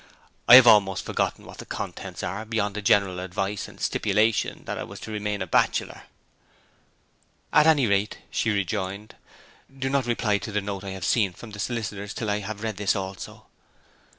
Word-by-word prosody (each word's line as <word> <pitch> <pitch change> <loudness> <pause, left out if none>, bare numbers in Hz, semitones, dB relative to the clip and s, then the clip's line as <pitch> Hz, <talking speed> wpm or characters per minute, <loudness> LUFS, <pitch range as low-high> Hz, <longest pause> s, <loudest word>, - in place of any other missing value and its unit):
I 125 - +11
have 130 -1 +10
almost 105 -4 +5
forgotten - - -2
what - - -12
the - - -8
contents - - -6
are, 100 +5 -3
beyond 110 -2 -2
the 105 - -3
general 100 -2 +2
advice 95 +2 -3
and - - -15
stipulation 105 +1 0
that - - -4
I - - -3
was - - -10
to 110 - -7
remain 105 -2 -2
a - - -5
bachelor.' 85 - 0 1.5
'At 150 +1 +6
any 150 -5 +5
rate,' 100 0 0
she 115 - 0
rejoined, 100 0 -2 0.6
'do 135 0 -3
not 135 -3 +1
reply 110 -3 +1
to 110 - -7
the 105 - 0
note 100 -1 -5
I 100 - -6
have 90 - -5
seen 100 -6 +2
from 110 +4 -11
the 105 - -9
solicitors 105 -2 -4
till 110 -3 -2
I 105 - 0
have 105 +1 -6
read 110 -3 -3
this 100 -1 +1
also.' 95 -1 -6
105 Hz, 185 wpm, -25 LUFS, 100-110 Hz, 1.5 s, I